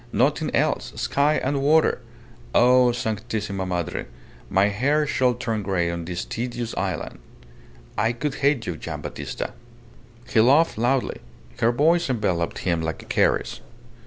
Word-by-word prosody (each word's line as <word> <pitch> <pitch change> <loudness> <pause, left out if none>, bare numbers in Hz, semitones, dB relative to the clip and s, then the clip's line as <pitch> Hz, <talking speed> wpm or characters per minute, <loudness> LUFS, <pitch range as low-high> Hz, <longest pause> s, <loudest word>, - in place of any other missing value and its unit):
Nothing - - +1
else. - - 0
Sky 145 +2 +2
and 135 +1 0
water. 155 +1 +3 0.6
Oh, 125 0 +6
Sanctissima 105 -4 -3
Madre. 90 -3 -3 0.4
My 100 +2 +3
hair 140 +9 +1
shall 130 -3 +1
turn 115 -3 -2
grey 90 -4 0
on 85 -1 -5
this 85 0 -4
tedious 120 0 -4
island. - - -3 0.8
I 115 - +2
could 135 +4 -3
hate 140 -5 +2
you, 90 -4 -4
Gian' - - -6
Battista!" - - -5 0.7
He 110 - +3
laughed 140 +2 +4
loudly. 125 +2 0 0.4
Her 115 - +3
voice 165 +6 +2
enveloped 95 -9 -1
him 85 -3 +1
like 80 0 -4
a - - -17
caress. - - +1
120 Hz, 140 wpm, -24 LUFS, 95-135 Hz, 0.8 s, Oh